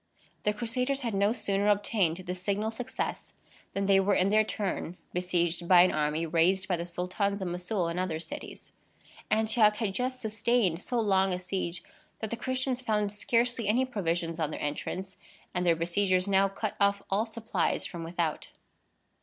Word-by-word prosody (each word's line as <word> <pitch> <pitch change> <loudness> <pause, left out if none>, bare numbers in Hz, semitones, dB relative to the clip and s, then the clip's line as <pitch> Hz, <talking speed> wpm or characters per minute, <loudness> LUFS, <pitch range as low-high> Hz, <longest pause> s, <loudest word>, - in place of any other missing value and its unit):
The 210 - +3
Crusaders 250 +5 -1
had 235 -4 -2
no 200 +2 +3
sooner 205 -3 0
obtained 205 -4 +2
this 180 0 -6
signal 205 +3 -1
success 250 +3 -4 0.4
than 195 0 -1
they 195 0 +5
were 195 +1 +2
in 185 +2 +3
their 215 +1 +5
turn 190 -4 -3 0.2
besieged 175 -1 0
by 180 -1 +8
an 185 - +3
army 155 +2 0
raised 175 +4 +2
by 185 - +1
the 170 0 -5
Sultans 185 +3 -1
of 190 - -3
Mossoul 180 +1 -2
and 170 +2 -2
other 175 -4 -1
cities. 165 0 -8 0.6
Antioch 220 -1 +3
had 210 -3 -2
just 255 +3 -2
sustained 220 -5 +1
so 245 +3 -1
long 195 -3 +2
a 180 - -2
siege, 180 -1 -3 0.3
that 220 - -5
the - - 0
Christians 260 +1 -1
found 210 -4 0
scarcely 230 +2 +2
any 245 +5 +3
provisions 170 -7 -2
on 155 -2 0
their - - -5
entrance, 185 +6 -4 0.4
and 180 0 0
their 170 - +5
besiegers 185 +2 +1
now 195 0 +4
cut 200 +2 -4
off 200 0 +2
all 210 +4 +1
supplies 225 0 -1
from 170 -2 -5
without. 165 -1 -2
195 Hz, 175 wpm, -29 LUFS, 180-220 Hz, 0.6 s, by